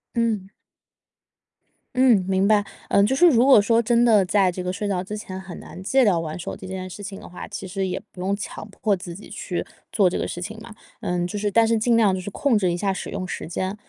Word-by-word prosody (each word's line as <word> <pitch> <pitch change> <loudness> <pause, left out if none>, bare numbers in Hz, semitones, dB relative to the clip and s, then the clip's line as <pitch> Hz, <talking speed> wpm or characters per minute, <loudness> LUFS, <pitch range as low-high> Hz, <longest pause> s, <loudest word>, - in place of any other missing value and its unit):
嗯。 220 -5 0 1.5
嗯， 245 -7 +5
明 190 +1 +2
白。 210 -1 +4 0.2
呃， 200 - +4
就 220 +6 +2
是 350 +6 +6
如 250 -7 +5
果 265 -5 +7
说 230 +3 +3
真 235 +1 +3
的 215 -4 +5
在 190 0 +2
这 180 +1 -5
个 180 - -2
睡 205 +2 -3
觉 185 -2 -1
之 210 +3 -6
前 190 -2 -7
很 190 -2 -9
难 185 - -10
戒 260 +7 +3
掉 190 -7 +3
玩 160 0 -4
手 175 - -5
机 190 - -10
这 190 - -6
件 185 0 -5
事 185 - -9
情 195 -1 -7
的 - - -11
话， 180 - -8
其 200 -2 -7
实 190 +1 -2
也 180 - -3
不 180 - -10
用 195 +2 0
强 205 0 -7
迫 200 0 0
自 175 -2 -8
己 205 - -11
去 190 -3 -4 0.3
做 200 -4 +4
这 175 - -1
个 - - -1
事 - - -5
情 215 +5 -6
嘛。 225 -1 -11 0.2
呃， 175 0 -1
就 205 +4 -4
是 205 0 0
但 225 +2 +4
是 230 -1 +2
尽 230 +1 +3
量 210 -4 +4
就 185 - -2
是 195 - -6
控 245 +4 +1
制 185 -4 +2
一 175 - -2
下 195 +1 0
使 - - -6
用 185 - -4
时 - - -5
间， 185 +3 -3
200 Hz, 280 characters per minute, -23 LUFS, 185-220 Hz, 1.5 s, 果